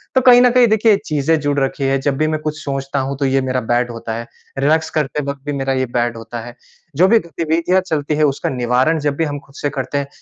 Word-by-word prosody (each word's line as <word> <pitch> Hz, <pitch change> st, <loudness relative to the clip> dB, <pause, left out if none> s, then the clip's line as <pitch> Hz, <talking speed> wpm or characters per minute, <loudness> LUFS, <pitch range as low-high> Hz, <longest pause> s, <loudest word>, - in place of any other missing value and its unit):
तो 260 Hz, -, +5 dB
कहीं 245 Hz, -1 st, +7 dB
न 250 Hz, -, +6 dB
कहीं 245 Hz, -1 st, +5 dB
देखिए 215 Hz, -1 st, +4 dB
चीज़ें 155 Hz, +2 st, +1 dB
जुड़ 145 Hz, -1 st, 0 dB
रखी 135 Hz, +1 st, -2 dB
हैं। 135 Hz, 0 st, +1 dB
जब 135 Hz, -1 st, -1 dB
भी 155 Hz, -, +1 dB
मैं 155 Hz, 0 st, -1 dB
कुछ 155 Hz, 0 st, -3 dB
सोचता 135 Hz, 0 st, -3 dB
हूँ 135 Hz, +1 st, -3 dB
तो 140 Hz, -, -1 dB
ये 135 Hz, 0 st, +2 dB
मेरा 130 Hz, -1 st, -1 dB
बेड 120 Hz, 0 st, +1 dB
होता 115 Hz, -1 st, -6 dB
है, 115 Hz, +1 st, -6 dB, 0.3 s
रिलैक्स 155 Hz, +4 st, +2 dB
करते 150 Hz, 0 st, -1 dB
वक़्त 140 Hz, -1 st, -5 dB
भी 145 Hz, -, -2 dB
मेरा 135 Hz, -1 st, -1 dB
ये 130 Hz, 0 st, 0 dB
बेड 120 Hz, -1 st, 0 dB
होता 115 Hz, +1 st, -7 dB
है। 120 Hz, 0 st, -10 dB, 0.4 s
जो 180 Hz, +6 st, +5 dB
भी 230 Hz, +3 st, +5 dB
गतिविधियाँ 170 Hz, +1 st, 0 dB
चलती 155 Hz, -4 st, -2 dB
हैं 155 Hz, -, +1 dB
उसका 140 Hz, -2 st, 0 dB
निवारण 130 Hz, +5 st, +1 dB
जब 145 Hz, -1 st, -1 dB
भी 165 Hz, -, +1 dB
हम 145 Hz, -1 st, -4 dB
खुद 135 Hz, 0 st, -22 dB
से 145 Hz, -, -2 dB
करते 140 Hz, 0 st, -3 dB
हैं, 140 Hz, -, -2 dB
140 Hz, 260 wpm, -18 LUFS, 135-160 Hz, 0.4 s, कहीं